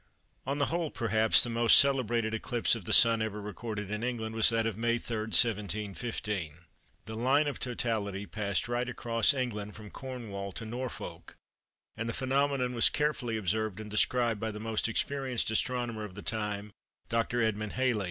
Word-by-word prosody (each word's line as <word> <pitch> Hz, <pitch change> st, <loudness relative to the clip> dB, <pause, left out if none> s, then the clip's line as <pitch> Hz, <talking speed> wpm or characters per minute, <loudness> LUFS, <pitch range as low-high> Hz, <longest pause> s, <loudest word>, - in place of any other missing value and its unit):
On 140 Hz, +1 st, -1 dB
the 145 Hz, -, +2 dB
whole, 165 Hz, 0 st, -1 dB
perhaps, 110 Hz, -3 st, +3 dB
the 120 Hz, -, -1 dB
most 115 Hz, 0 st, +6 dB
celebrated 120 Hz, -5 st, +3 dB
eclipse 115 Hz, +1 st, 0 dB
of 115 Hz, -6 st, -3 dB
the -, -, -3 dB
Sun 115 Hz, -1 st, +6 dB
ever 110 Hz, -1 st, -2 dB
recorded 105 Hz, 0 st, -5 dB
in 105 Hz, 0 st, -2 dB
England 115 Hz, -2 st, -3 dB
was 110 Hz, -1 st, +6 dB
that 115 Hz, -1 st, +1 dB
of 115 Hz, -3 st, -1 dB
May 115 Hz, +2 st, +1 dB
3, 120 Hz, -1 st, -5 dB
1715. 105 Hz, -4 st, 0 dB, 0.5 s
The 110 Hz, -, -7 dB
line 135 Hz, +6 st, +3 dB
of 145 Hz, -, -3 dB
totality 110 Hz, -5 st, -2 dB
passed 100 Hz, +2 st, -2 dB
right 120 Hz, +1 st, -1 dB
across 115 Hz, -1 st, +2 dB
England 110 Hz, -7 st, -3 dB
from 105 Hz, -1 st, -11 dB
Cornwall 110 Hz, -7 st, -6 dB
to 115 Hz, -, -4 dB
Norfolk, 125 Hz, +3 st, -6 dB, 0.6 s
and 115 Hz, +1 st, -3 dB
the -, -, -2 dB
phenomenon 135 Hz, -1 st, 0 dB
was 115 Hz, -, +5 dB
carefully 140 Hz, -6 st, -1 dB
observed 110 Hz, +1 st, -1 dB
and 105 Hz, -1 st, -8 dB
described 115 Hz, +1 st, +2 dB
by 110 Hz, -, -2 dB
the 105 Hz, -1 st, -6 dB
most 110 Hz, +1 st, -1 dB
experienced 130 Hz, -1 st, 0 dB
astronomer 120 Hz, -1 st, -1 dB
of 100 Hz, -3 st, -8 dB
the 105 Hz, -, -8 dB
time, 105 Hz, -2 st, -3 dB, 0.4 s
Dr. 115 Hz, +1 st, 0 dB
Edmund 110 Hz, -1 st, -1 dB
Halley. 130 Hz, -4 st, +1 dB
115 Hz, 170 wpm, -30 LUFS, 105-125 Hz, 0.6 s, most